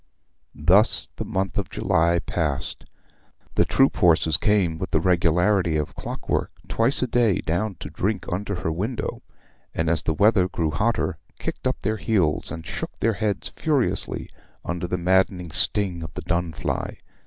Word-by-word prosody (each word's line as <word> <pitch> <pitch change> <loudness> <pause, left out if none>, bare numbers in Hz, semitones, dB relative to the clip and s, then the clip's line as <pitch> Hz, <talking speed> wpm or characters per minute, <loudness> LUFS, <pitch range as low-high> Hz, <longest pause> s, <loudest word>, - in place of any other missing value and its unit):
Thus 90 +9 +3
the - - -2
month 95 -1 -2
of - - -3
July 85 +1 +2
passed. 80 -4 -2 0.7
The - - +3
troop 135 0 +3
horses 80 -3 +4
came 90 -3 +2
with 95 - -3
the - - +2
regularity 90 0 +2
of 75 -2 -2
clockwork - - -3 0.2
twice 120 +4 +1
a - - 0
day 115 -6 +3
down 95 +5 -1
to - - -6
drink 100 0 -1
under 100 +3 -2
her 80 - -1
window, 105 +9 -3 0.5
and, 80 0 +1
as 85 - +3
the 80 - -1
weather 100 -1 +4
grew 80 -3 -1
hotter, 75 - 0 0.2
kicked - - -3
up - - -1
their 110 +2 0
heels 95 -9 +1
and 80 -1 -6
shook - - -6
their 115 0 +2
heads 105 -1 -2
furiously 145 -6 0 0.4
under 85 +1 -2
the 90 - -1
maddening 90 -1 +1
sting 95 -2 +2
of 80 - -6
the 90 - -4
dun 85 -1 0
fly. 70 - -3
90 Hz, 165 wpm, -24 LUFS, 85-105 Hz, 0.7 s, horses